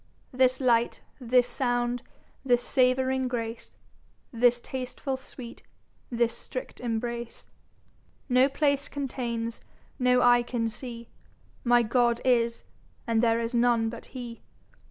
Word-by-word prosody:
This 255 0 +3
Light, 240 -3 +2 0.2
this 250 0 +3
Sound, 245 -1 -1 0.4
this 245 -2 +2
Savouring 260 0 +2
Grace, 230 -2 -5 0.6
This 240 +1 +4
Tastefull 260 +1 -4
Sweet, 245 -2 -10 0.5
this 235 -1 +1
Strict 255 +2 -7
Embrace, 235 0 -4 0.8
No 255 +1 +4
Place 280 0 +1
containes, 235 -4 -4 0.4
no 250 0 +4
Eye 245 0 +6
can 240 -1 -2
see, 235 0 -8 0.6
My 240 -1 +4
God 235 0 +2
is; 235 -2 +2 0.4
and 230 -2 +2
there's 230 0 +1
none 235 -1 +3
but 235 - -9
Hee. 240 -2 -7
245 Hz, 115 wpm, -27 LUFS, 235-255 Hz, 0.8 s, Eye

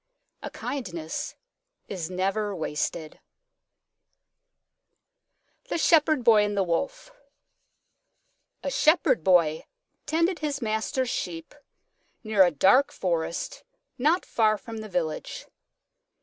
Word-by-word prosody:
A - - -5
kindness 175 - -5 0.5
is 180 -4 -5
never 195 +3 -1
wasted. 155 0 -3 2.5
THE - - -1
SHEPHERD 310 -4 +3
BOY 220 -3 +6
AND 205 -1 -2
THE 195 - +3
WOLF 275 - -3 1.5
A - - -2
Shepherd 310 - +3
Boy 165 -4 +3 0.4
tended 335 +3 +1
his 290 -2 -2
master's 230 +2 -1
Sheep 165 -2 -5 0.7
near 215 -3 +4
a 180 - +4
dark 195 - +4
forest 170 -2 -3 0.4
not 310 +8 +2
far 215 -2 +2
from 225 +1 -9
the 215 -1 -7
village. 175 - -3
215 Hz, 100 wpm, -26 LUFS, 175-280 Hz, 2.5 s, BOY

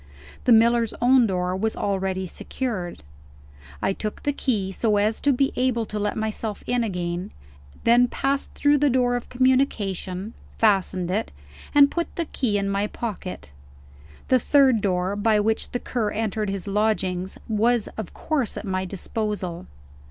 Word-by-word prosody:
The 250 - +4
miller's 230 0 +4
own 245 0 +5
door 180 -1 -1
was 220 +3 -1
already 190 -1 -1
secured; 185 - -5 0.8
I - - +2
took 215 +2 -5
the 290 - 0
key, 210 -9 -1
so 210 +2 +1
as 215 +2 +1
to 285 - +3
be 270 +1 +1
able 245 -2 +1
to 210 0 -4
let 205 0 -1
myself 220 -1 -3
in 245 -1 +1
again 180 -2 -3 0.5
then 240 +1 +5
passed 275 +3 -1
through 290 0 +3
the 290 0 +3
door 245 -1 +2
of 245 - -5
communication 220 -6 0 0.2
fastened 190 -4 +2
it 215 +4 -1 0.4
and 285 -1 +7
put 340 -1 -3
the 335 - -1
key 235 -9 0
in 200 0 -1
my 200 +1 0
pocket. 195 - -6 0.8
The 255 - +5
third 265 -3 +4
door, 185 0 0
by 210 +1 +2
which 220 +1 0
the 245 - -3
Cur 230 -4 -2
entered 215 -1 -2
his 195 -2 -4
lodgings, 195 -3 0
was 225 +1 +2
of 220 - -6
course 280 -9 -2
at - - -5
my 190 -1 -1
disposal. 195 -2 -4
215 Hz, 160 wpm, -24 LUFS, 195-245 Hz, 0.8 s, and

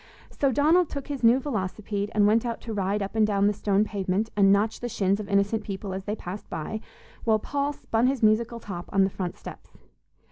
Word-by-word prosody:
So 275 -2 +1
Donald 315 +6 +3
took 280 0 -6
his 280 -3 -4
new 235 +3 +6
velocipede 205 -5 -3
and 205 -1 +5
went 220 +2 +4
out 235 -2 -3
to 225 - -6
ride 200 0 0
up 195 - -6
and 215 -1 +4
down 200 -1 +2
the 205 - +3
stone 200 0 +1
pavement 205 +1 -2
and 195 -1 +5
notch 210 +2 +2
the 240 - -4
shins 200 -2 +1
of 210 -1 -6
innocent 200 +2 +1
people 195 -1 -5
as 190 0 -5
they 210 - -2
passed 195 0 -8
by, 215 +8 -4 0.4
while 220 -1 +3
Paul 280 +6 -2
spun 235 -4 0
his 265 -3 -1
musical 230 +2 +2
top 180 -5 -7
on 195 0 +4
the 190 - +1
front 180 -2 -4
steps. - - -11
210 Hz, 220 wpm, -26 LUFS, 200-230 Hz, 0.4 s, new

